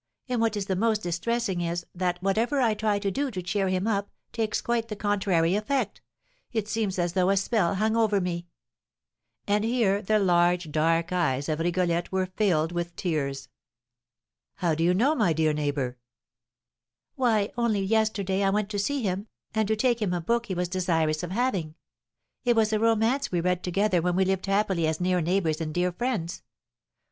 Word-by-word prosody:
And 250 -3 -1
what 225 -2 +1
is 200 - -2
the 190 - -1
most 215 +2 +1
distressing 190 +2 -1
is, 170 0 -2
that, 180 -1 -1
whatever 225 +8 +1
I 235 -4 +3
try 210 -1 0
to 200 -1 -1
do 280 +7 -1
to 190 -7 -5
cheer 195 +2 0
him 185 +1 0
up, 200 -2 0 0.2
takes 220 -2 -1
quite 235 -1 -1
the 215 - -5
contrary 195 -5 +1
effect; 210 +1 -1 0.5
it 220 -3 -2
seems 215 -3 -1
as 175 -1 0
though 185 0 +2
a 195 - +3
spell 195 -2 +1
hung 220 +3 +1
over 215 -3 +3
me!" 175 -1 -3 1.0
And 205 +1 +1
here 225 -4 +1
the 215 +1 +2
large, 175 -3 +2
dark 165 +3 +1
eyes 145 -6 0
of 155 -1 -1
Rigolette 175 0 0
were 190 0 +1
filled 170 -6 +2
with 175 0 -4
tears. 140 -6 -2 1.1
"How 175 -4 0
do 160 +1 0
you 180 +2 +3
know, 260 +10 +3
my 210 - +2
dear 155 0 +2
neighbour?" 140 -4 -2 1.1
"Why, 225 -6 +1
only 230 -4 +1
yesterday 200 -2 +1
I 195 - +3
went 205 +1 0
to 205 - -2
see 275 +6 -1
him, 195 +1 -2 0.3
and 220 -1 +1
to 220 - +1
take 235 +1 +1
him 195 -4 0
a - - -1
book 235 +6 0
he 190 - -3
was 180 0 -1
desirous 165 -4 0
of 175 - -5
having; 190 -8 -1 0.7
it 240 -2 +3
was 220 -1 +2
a 215 - +2
romance 230 +5 +2
we 175 - +1
read 180 +1 0
together 185 0 +1
when 175 +1 0
we 190 +1 +3
lived 190 0 -1
happily 195 -4 +1
as 160 0 -1
near 180 0 +1
neighbours 165 -2 0
and 155 -1 -3
dear 180 +3 0
friends. 190 -5 -3
195 Hz, 190 wpm, -26 LUFS, 175-220 Hz, 1.1 s, I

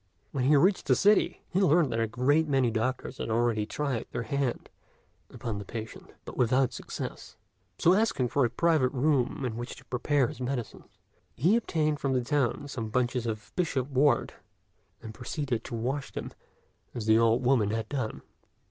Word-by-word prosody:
When 130 -3 -1
he 150 +3 +5
reached 185 +7 +3
the - - +5
city, 205 +1 +3
he 190 - +1
learned 165 -6 +4
that 115 - -1
a 115 - +1
great 145 +8 +2
many 135 -4 +2
doctors 125 +3 -2
had - - -3
already 110 -2 +1
tried 140 -2 -2
their 120 - -3
hand 135 +1 -2 0.6
upon 110 -3 -5
the - - -6
patient, 110 +2 -8 0.2
but - - -8
without 125 +1 +2
success; - - -7 0.4
so 175 - +5
asking 190 - +1
for 140 - +2
a 120 - +2
private 150 0 +2
room 135 -1 +1
in 115 -2 -3
which 120 +1 -5
to - - -16
prepare 135 +2 +1
his 125 - -6
medicines, 125 -2 -4 0.5
he 175 - +3
obtained 155 -9 0
from 135 -1 0
the 125 -1 +1
town 145 0 0
some 115 -6 -5
bunches 125 +1 0
of 110 -1 -5
bishop 145 -7 -1
wort, 140 +2 +2 0.7
and 110 - -7
proceeded 125 -1 -3
to - - -5
wash 130 +5 -3
them - - -6 0.6
as 115 -3 -4
the 110 0 +5
old 115 +2 +3
woman 120 -5 +3
had 110 0 -2
done. 130 -5 -4
130 Hz, 180 wpm, -28 LUFS, 115-145 Hz, 0.7 s, he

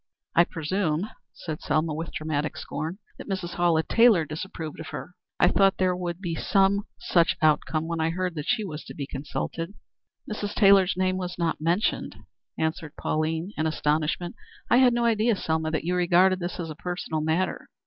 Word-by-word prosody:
"I 170 - +6
presume," 165 +2 -1 0.2
said 155 -3 -6
Selma, 155 +1 0
with 165 +2 -4
dramatic 155 -1 -2
scorn, 155 +5 -4 0.2
"that - - -9
Mrs. 185 -3 -3
Hallett 170 -2 +2
Taylor 225 -8 +5
disapproved 155 0 -6
of 160 - -7
her. 180 - -7 0.3
I - - +6
thought 195 -1 +4
there 185 -1 +2
would 175 -1 -4
be 175 -4 -3
some 195 +5 +2
such 170 -2 +2
outcome 155 0 +2
when 165 -1 -2
I 160 - +2
heard 180 +1 -2
that 150 -3 -5
she 245 -3 +1
was 155 -6 -6
to - - -9
be 140 - -4
consulted." 165 +6 -4 0.5
"Mrs. 210 -1 -4
Taylor's 195 -2 +5
name 185 0 +1
was 180 -1 -4
not 170 -2 -1
mentioned," 170 +6 0 0.4
answered 160 -1 -2
Pauline, 160 +4 -1
in 155 - 0
astonishment. 155 +3 0 0.4
"I 240 - +7
had 255 -1 +6
no 240 0 +1
idea, 225 0 +3
Selma, 160 -3 -1
that 160 -1 -1
you 175 +2 -1
regarded 180 +1 +4
this 175 +1 -4
as 165 -2 -4
a - - -7
personal 175 -2 -3
matter. 160 +4 -1
170 Hz, 180 wpm, -26 LUFS, 160-190 Hz, 0.5 s, I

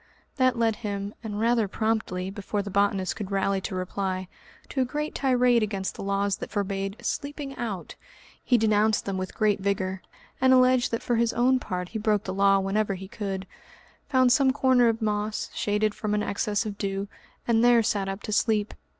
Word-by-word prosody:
That 255 -2 +3
led 225 -2 +1
him, 200 -2 -4
and 210 -2 -4
rather 230 -1 +2
promptly, 195 -3 -1
before 205 0 -3
the 200 - -6
botanist 200 -1 +1
could 205 -3 -5
rally 195 0 0
to 190 - -4
reply, 185 0 -3 0.4
to 265 - -1
a - - +4
great 300 +4 -3
tirade 250 -3 +3
against 200 -3 -2
the - - -9
laws 200 0 0
that - - -7
forbade 195 -1 -2
"sleeping 285 -1 -4
out." 205 -7 -5 0.5
He 245 - +3
denounced 215 -1 +2
them 195 -1 -2
with 185 0 -5
great 210 -2 +2
vigour, 190 -1 -1 0.4
and 260 0 +6
alleged 255 -1 +4
that 230 - -3
for 240 - +1
his 235 0 +2
own 255 +2 +3
part 180 -5 -4
he 220 - -4
broke 210 -1 +1
that 185 - -4
law 195 +1 +4
whenever 195 +1 0
he 190 +1 -8
could, 195 -2 -4 0.6
found 255 -3 +4
some 270 0 +4
corner 260 -2 +4
of 225 0 -2
moss, 210 0 -2
shaded 210 0 0
from 210 0 -2
an 210 - 0
excess 205 +1 -1
of 205 -1 -6
dew, 195 0 -2 0.4
and 230 -1 +3
there 240 -1 +6
sat 205 -3 0
up 195 +1 -5
to - - -5
sleep. 210 0 +1
210 Hz, 195 wpm, -26 LUFS, 195-235 Hz, 0.6 s, and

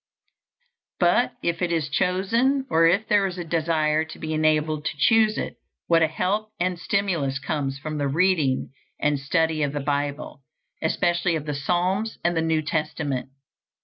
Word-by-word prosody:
But 180 +7 +3
if 170 0 -1
it 175 -1 0
is 160 -3 0
chosen, 225 - +1
or 165 +1 +5
if 195 +6 +2
there 205 -2 +3
is 185 -1 -6
a 175 - -3
desire 160 -2 +1
to 160 - -10
be 155 0 -4
enabled 155 -1 +1
to 155 - -3
choose 220 +6 +4
it, - - -4 0.3
what 165 -1 +3
a 160 - +5
help 195 +7 -1
and 180 0 -1
stimulus 175 -9 0
comes 135 -1 -3
from 155 +1 -5
the 140 - 0
reading 155 -3 +1 0.3
and 145 -1 +1
study 160 +2 0
of 145 -1 0
the 145 - -2
Bible, 145 0 -3 0.4
especially 170 +1 +1
of 155 -2 -4
the 150 - -2
Psalms 180 +9 -1
and 175 0 +1
the 165 - +1
New 160 -1 +1
Testament! 150 -4 -2
160 Hz, 170 wpm, -24 LUFS, 150-180 Hz, 0.4 s, or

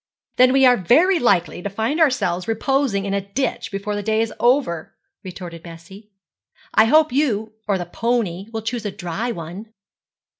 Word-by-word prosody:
'Then 255 0 +6
we 270 0 +4
are 250 -1 +6
very 325 - +3
likely 175 -8 +1
to 205 - -4
find 225 - -2
ourselves 185 - +1
reposing 225 -2 0
in 195 - -2
a 200 - 0
ditch 255 +5 -3
before 200 +1 -4
the 205 - -2
day 220 +1 0
is 225 0 -1
over,' 240 - +1 0.3
retorted 175 -3 -8
Bessie. 175 +6 -13 0.6
'I 220 - +6
hope 310 +6 +4
you 220 -7 0
or 200 -2 +1
the 175 - -4
pony 205 -2 -2
will 225 -1 -5
choose 230 0 -3
a 210 - -2
dry 190 +5 -4
one.' 185 +3 -8
215 Hz, 175 wpm, -21 LUFS, 190-250 Hz, 0.6 s, Then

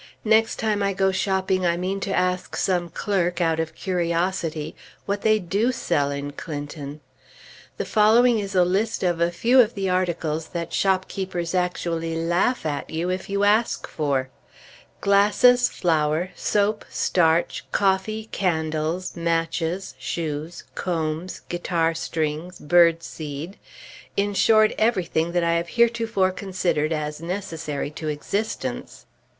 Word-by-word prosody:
Next 220 +1 +3
time 215 -2 0
I 200 0 +1
go 190 0 +2
shopping, 190 -1 0
I 170 -1 +2
mean 185 +2 -2
to 195 - -4
ask 180 -1 0
some 175 -2 0
clerk, 180 0 -1
out 165 -2 +1
of 160 0 -3
curiosity, 170 -3 -1 0.3
what 200 0 -2
they 215 0 +4
do 205 +6 0
sell 145 - 0
in 140 0 -4
Clinton. 145 -1 -7 0.8
The - - -2
following 225 +2 +4
is 195 -2 -4
a 180 -1 +5
list 200 +5 0
of 175 -2 +1
a 170 - +3
few 230 +9 +3
of 230 -1 0
the 195 -2 -1
articles 165 -4 -1
that 170 -1 -5
shopkeepers 185 -2 -1
actually 170 -2 -1
laugh 175 +7 +1
at 145 -2 -3
you 165 +3 -2
if 185 +1 -4
you 200 0 0
ask 215 +3 +2
for: 135 -4 -1 0.7
Glasses, 210 +5 +5
flour, 160 +1 0
soap, 210 +1 0
starch, 165 -1 +1
coffee, 200 +3 +1
candles, 160 -1 -1
matches, 165 +2 -1
shoes, 160 0 -4
combs, 165 0 -3
guitar 170 -1 0
strings, 160 +1 -3
bird 165 +1 +4
seed, 155 +4 -7 0.6
in 205 +1 +1
short, 215 +2 +4
everything 180 -7 +1
that 175 -1 +2
I 170 0 +2
have 170 +1 -2
heretofore 230 -4 +2
considered 185 -5 -1
as 150 -1 -3
necessary 165 -5 -4
to 155 +1 -6
existence. 195 +9 -3
175 Hz, 135 wpm, -24 LUFS, 160-200 Hz, 0.8 s, a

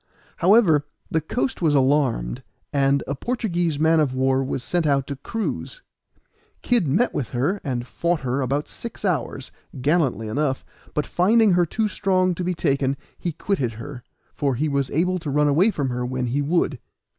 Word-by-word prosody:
However, 170 -7 +4 0.2
the 160 - +1
coast 245 - -2
was 155 -4 +3
alarmed, 130 - +1 0.3
and 140 0 +2
a 140 - -2
Portuguese 175 - -1
man 160 +2 +4
of 140 -4 +1
war 130 +1 +2
was 130 -1 -3
sent 175 -3 0
out 140 -2 +2
to 140 - -5
cruise. 225 - -4 0.8
Kid 235 -9 +2
met 185 - +2
with 130 - -2
her, 145 +11 -1
and 125 -4 -2
fought 170 +5 -1
her 130 +1 -1
about 140 +3 -1
six 230 -2 -8
hours, 150 -7 -2 0.3
gallantly 135 - +1
enough; 135 +3 -1 0.3
but 150 - 0
finding 215 +4 +4
her 175 -1 +3
too 220 +6 0
strong 185 -3 +1
to 180 - -4
be 180 0 -1
taken, 140 -2 0 0.2
he 175 - -2
quitted 150 - -1
her, 125 +3 -8 0.3
for 140 -3 0
he 150 +6 0
was 140 -2 0
able 180 +4 +1
to 160 -3 -5
run 150 +1 +2
away 165 +9 +4
from 145 -10 -1
her 125 0 -2
when 125 0 -2
he 130 +4 0
would. 150 -3 0
145 Hz, 180 wpm, -23 LUFS, 135-175 Hz, 0.8 s, However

